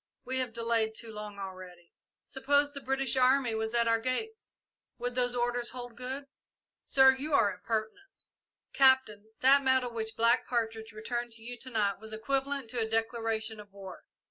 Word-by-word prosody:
"We 260 +1 -1
have 255 -3 -1
delayed 230 -1 0
too 225 0 -6
long 210 -1 -8
already." 185 -3 -9 0.3
"Suppose 285 +2 +1
the 280 - -7
British 270 0 0
army 255 -1 +3
was 220 +1 -2
at 235 -1 +3
our 230 0 +3
gates 440 - -3 0.5
would 245 0 -3
those 245 0 0
orders 240 0 0
hold 245 -2 -7
good?" 260 +3 -6 0.6
"Sir, 265 -1 +6
you 285 +2 -1
are 200 -7 +3
impertinent!" 220 - -5 0.5
"Captain, 260 -6 +4 0.2
that 275 +2 +6
medal 260 -2 +1
which 220 -1 -4
Black 230 +2 +3
Partridge 225 -2 -2
returned 235 +2 -4
to 225 0 -11
you 245 +1 -6
to 260 - -9
night 205 -5 0
was 220 0 -8
equivalent 270 +2 -2
to 245 - -3
a 220 -1 -1
declaration 225 -1 -1
of 205 -1 -12
war. 195 -1 -11
235 Hz, 170 wpm, -30 LUFS, 220-260 Hz, 0.6 s, Sir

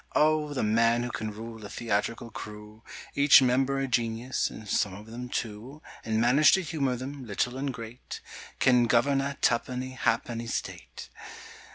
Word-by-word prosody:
Oh, 155 -1 +3
the 130 - 0
man 115 +2 +3
who 120 - -4
can 110 -2 -4
rule 110 +1 -8
a 105 - -7
theatrical 115 +1 -2
crew, 105 0 -9 0.3
Each 140 0 +7
member 135 +1 +2
a 135 - 0
genius 120 0 -1
(and 110 - -10
some 95 -1 0
of 105 +2 -11
them 120 +2 -7
two), 120 +6 -5 0.2
And 110 -1 0
manage 130 +6 +5
to 190 - +3
humour 140 -6 -1
them, 135 +2 -7
little 120 +4 -1
and 135 +1 -2
great, 115 0 -8 0.4
Can 125 -2 +4
govern 135 +5 +3
a 140 0 -3
tuppenny 125 +1 0
ha'penny 120 -2 -1
State! - - -6
120 Hz, 165 wpm, -28 LUFS, 110-135 Hz, 0.4 s, Each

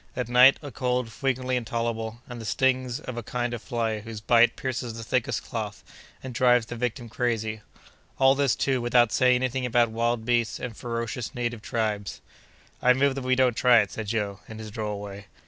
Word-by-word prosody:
At 125 -3 -2
night, 125 +2 +7
a 145 - -7
cold 125 -1 -1
frequently 130 +1 -1
intolerable, 115 -1 -3
and 125 -2 -8
the - - -7
stings 130 +3 +1
of 130 -5 -7
a - - -2
kind 120 +1 -3
of 120 - -5
fly 115 -3 -2
whose 110 0 -8
bite 120 +2 +4
pierces 125 -3 -4
the 115 - -6
thickest 125 +2 -1
cloth, - - -5 0.4
and 130 -1 -6
drives 125 0 +4
the 120 - -7
victim 120 0 -3
crazy! 110 -2 -2 0.6
All 135 0 +6
this, 140 -3 +2
too, 130 -2 0
without 120 -1 +3
saying 125 -1 +4
any 130 +1 +1
thing 130 +1 -3
about 120 -2 +2
wild 115 0 -1
beasts 120 -2 +1
and 120 -3 -5
ferocious 115 +1 -4
native 120 -2 -3
tribes!" 105 -3 -2 0.6
"I 125 - +6
move 135 +2 +2
that 135 - -4
we 130 0 +2
don't 130 -1 +3
try 125 -1 +6
it!" 100 - -4
said 110 -2 -5
Joe, 100 -2 -2
in 110 - -9
his 110 -1 -8
droll 105 -2 -4
way. 100 0 -9
120 Hz, 200 wpm, -26 LUFS, 110-125 Hz, 0.6 s, night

